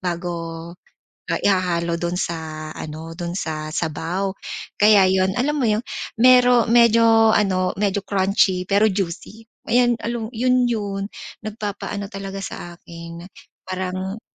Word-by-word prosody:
bago 170 -2 -4 0.6
ihahalo 175 -3 +1
dun 175 0 -2
sa 160 -3 -4
ano 160 +2 -7
dun 175 -1 -4
sa 155 -3 -4
sabaw. 170 +5 -2 0.5
Kaya 205 -2 +7
yun 190 0 +2
alam 290 +3 0
mo 235 - +2
yun 210 +1 +2 0.4
mero 250 -1 +6
medyo 230 -1 +5
ano 185 -3 +1
medyo 200 0 0
crunchy 190 -1 +2
pero 205 +2 +4
juicy 200 +3 -4 0.2
ayan 240 0 +3
alam 230 -1 -3
yun 250 +1 +2
yun 200 -4 -2 0.4
nagpapaano 205 -1 -5
talaga 195 0 -6
sa 175 -1 -7
akin 170 0 -10 0.4
parang 185 +2 -4
195 Hz, 120 wpm, -21 LUFS, 170-220 Hz, 0.6 s, Kaya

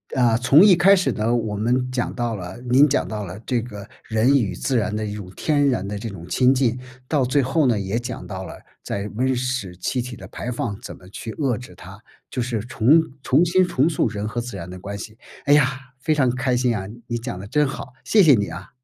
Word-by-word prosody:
啊， 120 -3 +3
从 135 +8 +6
一 205 -3 +8
开 190 +3 +6
始 185 - +1
呢， 115 +2 0
我 110 -3 -2
们 125 +4 0
讲 125 -2 -2
到 120 -2 -1
了 90 +2 -7
您 130 +4 +5
讲 140 - +1
到 105 -2 -4
了 90 +2 -8
这 125 -3 0
个 105 -4 -8 0.2
人 115 +5 +3
与 105 -7 -1
自 130 -4 0
然 105 -1 0
的 110 0 -2
一 105 - -4
种 100 -3 -8
天 145 -2 +2
然 110 -7 -1
的 100 0 -4
这 115 - -5
种 90 -4 -9
亲 130 +1 +4
近， 125 -2 +1 0.3
到 145 -5 +1
最 140 +3 +2
后 140 +3 +1
呢， 115 -4 +2
也 100 +4 -2
讲 125 0 -6
到 95 -1 -6
了 - - -9 0.3
在 100 +1 -4
温 130 +2 +1
室 125 -7 -3
气 125 +7 -1
体 120 -1 -7
的 - - -11
排 125 - -6
放 115 -3 -3
怎 - - -8
么 90 0 -16
去 110 +2 -7
遏 135 -7 0
制 120 -7 -11
它， 95 +3 -12 0.3
就 125 - -3
是 115 -3 -2
重 120 +7 +4 0.2
重 140 +7 +3
新 185 +2 +3
重 140 +3 +2
塑 155 - +1
人 105 -1 -4
和 120 +2 -3
自 120 -3 -6
然 90 -1 -7
的 90 0 -8
关 100 +2 -6
系。 110 +2 -9 0.3
哎 145 - +5
呀， 135 -3 +3 0.2
非 155 +3 +1
常 130 -4 +2
开 125 0 0
心 125 -1 +2
啊， 95 - -5 0.2
你 120 -1 -2
讲 120 -5 -5
得 95 - -8
真 150 +5 +2
好， 135 -1 -7
谢 210 -3 +5
谢 150 -4 +7
你 100 -1 0
啊。 90 +2 -8
120 Hz, 265 characters per minute, -22 LUFS, 105-130 Hz, 0.3 s, 一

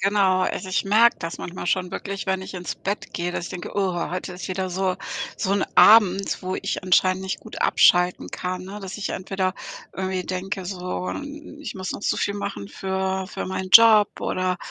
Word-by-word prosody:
Genau, 195 -1 +3
also, 190 - -2
ich 185 - 0
merke 220 +4 +5
das 165 0 -5
manchmal 175 0 -6
schon 180 0 0
wirklich, 195 +1 -5
wenn 190 0 0
ich 190 - -9
ins 180 -1 -4
Bett 200 +2 -4
gehe, 175 0 -2
dass 175 - -3
ich - - -7
denke: 180 - -6
„Oh, 190 -2 +1 0.2
heute 180 +1 -4
ist 180 +2 -7
wieder 185 0 -2
so 185 0 0 0.4
so 190 - -1
'n 200 - +2
Abend, 200 -3 +6
wo 185 +1 -3
ich - - -3
anscheinend 185 +1 +3
nicht 190 - -4
gut - - -10
abschalten 180 0 +4
kann, 180 0 -4
ne?“ 200 +2 -8
Dass 195 +1 -7
ich 210 - -3
entweder 185 0 -2 0.4
irgendwie 185 -1 -3
denke 190 +1 -4
so, 180 0 -4
hm, 295 +1 -8
ich 300 - -6
muss 185 0 -4
noch - - -7
so - - +1
viel 200 - -1
machen 100 - -5
für 190 - -2
für - - -5
meinen 185 0 -4
Job 220 -3 +7
oder, 185 0 -1
190 Hz, 205 wpm, -23 LUFS, 185-195 Hz, 0.4 s, Job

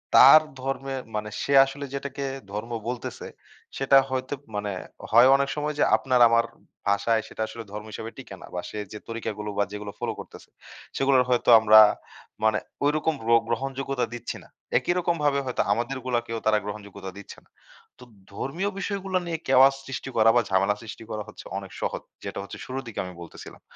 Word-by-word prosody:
তার 155 - +10 0.2
ধর্মের 135 0 -3
মানে 105 0 -3
সে 140 - -1
আসলে 140 +1 -6
যেটাকে 140 0 -4 0.3
ধর্ম 105 +3 -5 0.2
বলতেছে 125 0 -5 0.5
সেটা 135 0 +5
হয়তো 130 +1 -2 0.2
মানে 105 0 -2 0.4
হয় 120 +3 +8
অনেক 140 0 +1
সময় 150 0 -2
যে, - - +5
আপনার 130 -2 +1
আমার 115 0 +3 0.4
ভাষায় 110 +3 +2
সেটা - - -8
আসলে 115 +1 -8
ধর্ম 105 +1 -6
হিসেবে 110 +2 -6
টিকে 130 -7 -9
না - - -9
বা 90 - -2
সে - - -8
যে, 105 - -6
তরিকাগুলো 105 -2 -4
বা 100 - +3
যেগুলো 105 0 -6
ফলো - - -2
করতেছে। - - -11 0.5
সেগুলো 135 0 +3
হয়তো 125 -1 +2
আমরা 110 0 +8 0.6
মানে 110 -1 +3 0.3
ঐরকম 155 +2 +1
গ্র 115 - -4 0.2
গ্রহণযোগ্যতা 135 +2 -2
দিচ্ছি 120 0 -5
না। - - -18 0.3
একই - - +1
রকম 170 -1 +1
ভাবে 140 -1 +3
হয়তো 125 - -1
আমাদেরগুলোকেও 120 -1 -2
তারা 110 0 +4
গ্রহণযোগ্যতা 100 -2 -7
দিচ্ছে 100 - -11
না। - - -32 0.5
তো - - -12 0.3
ধর্মীয় 170 - -2
বিষয়গুলো 195 -2 -2
নিয়ে 170 -1 -2
কেওয়াস 135 +1 +6
সৃষ্টি 135 0 -5
করা 110 0 +6
বা 120 - +5
ঝামেলা 95 +2 +2
সৃষ্টি 115 0 -9
করা 105 -1 -3
হচ্ছে - - -12
অনেক - - -7
সহজ। - - -2 0.2
যেটা - - -5
হচ্ছে 100 - -9
শুরুর 135 +1 -5
দিকে 115 - -6
আমি 90 - -8
বলতেছিলাম। 85 - -11
120 Hz, 175 wpm, -25 LUFS, 105-135 Hz, 0.6 s, তার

